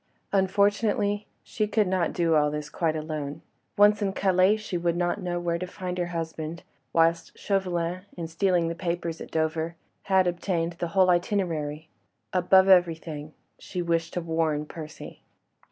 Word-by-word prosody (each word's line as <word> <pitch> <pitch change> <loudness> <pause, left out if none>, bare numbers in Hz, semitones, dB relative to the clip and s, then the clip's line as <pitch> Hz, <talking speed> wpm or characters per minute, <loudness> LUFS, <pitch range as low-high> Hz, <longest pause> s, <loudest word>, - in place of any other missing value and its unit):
Unfortunately, 205 +1 +2 0.2
she 215 -1 -2
could 210 -1 +2
not 185 -2 +1
do 170 -2 +1
all 150 -1 +4
this 150 0 -5
quite 160 -2 0
alone. 155 -1 -4 0.3
Once 205 +1 +5
in 195 -1 0
Calais 190 +2 +3
she 215 -3 -6
would 170 0 0
not 175 0 0
know 175 -1 -2
where 170 -1 -1
to 185 - -4
find 180 -1 -5
her 175 - 0
husband, 165 -1 -5 0.3
whilst 165 0 +2
Chauvelin, 180 -3 -1 0.2
in 170 - -3
stealing 170 0 +1
the 165 - -2
papers 170 -1 -3
at - - -8
Dover, 160 +1 -1 0.3
had 190 -1 +4
obtained 175 -1 -1
the 175 - -1
whole 185 -1 +6
itinerary. 165 -5 -1 0.5
Above 190 +1 +5
everything, 165 -4 +2 0.2
she 180 -2 -4
wished 165 -1 -1
to 180 - 0
warn 160 -2 0
Percy. 155 -1 -9
175 Hz, 155 wpm, -26 LUFS, 165-190 Hz, 0.5 s, whole